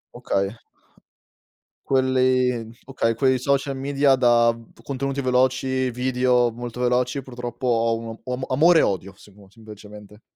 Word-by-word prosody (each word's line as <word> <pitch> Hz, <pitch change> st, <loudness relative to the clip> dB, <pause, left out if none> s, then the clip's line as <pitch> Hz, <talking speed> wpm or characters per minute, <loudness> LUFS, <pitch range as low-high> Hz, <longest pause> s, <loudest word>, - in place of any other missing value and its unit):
Okay. 100 Hz, +3 st, -2 dB, 1.3 s
Quelli 130 Hz, -3 st, +1 dB
okay, 120 Hz, -4 st, -1 dB
quei 130 Hz, +2 st, +2 dB
social 140 Hz, +1 st, -1 dB
media 135 Hz, 0 st, +2 dB
da 120 Hz, -2 st, +3 dB
v 115 Hz, -, -19 dB
contenuti 140 Hz, 0 st, -4 dB
veloci, 130 Hz, 0 st, +1 dB
video 125 Hz, 0 st, +1 dB
molto 120 Hz, +1 st, -8 dB
veloci 125 Hz, +2 st, 0 dB
purtroppo 120 Hz, 0 st, -6 dB
ho 115 Hz, -1 st, +2 dB
un 115 Hz, -, -8 dB, 0.2 s
o 125 Hz, -, -6 dB
om 130 Hz, +1 st, -3 dB
amore 160 Hz, +5 st, +4 dB
e -, -, +4 dB
odio 95 Hz, 0 st, -2 dB
semo 100 Hz, -1 st, -18 dB
semplicemente. 105 Hz, -1 st, -14 dB
125 Hz, 135 wpm, -23 LUFS, 115-130 Hz, 1.3 s, amore